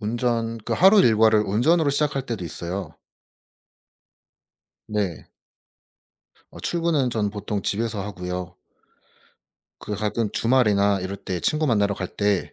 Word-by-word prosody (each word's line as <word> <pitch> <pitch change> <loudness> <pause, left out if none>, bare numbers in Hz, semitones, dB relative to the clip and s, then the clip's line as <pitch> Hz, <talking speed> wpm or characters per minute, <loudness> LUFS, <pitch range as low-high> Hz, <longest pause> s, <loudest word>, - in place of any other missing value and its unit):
운전 115 +1 -1
그 115 +2 -5
하루 195 - +6
일과를 110 - +4
운전으로 135 - +2
시작할 140 -1 0
때도 110 -7 -4
있어요. 85 -1 -5 1.9
네. 100 -6 -3 1.2
어 - - -11
출근은 165 -7 0
전 105 -3 -1
보통 105 -1 -4
집에서 110 -1 -2
하고요. 90 -2 -5 1.3
그 105 - -5
가끔 105 +1 -1
주말이나 105 -5 +2
이럴 95 +2 -4
때 90 -2 -5
친구 155 0 +1
만나러 105 -4 +2
갈 95 -1 -5
때 100 -2 -1
105 Hz, 245 characters per minute, -23 LUFS, 100-120 Hz, 1.9 s, 하루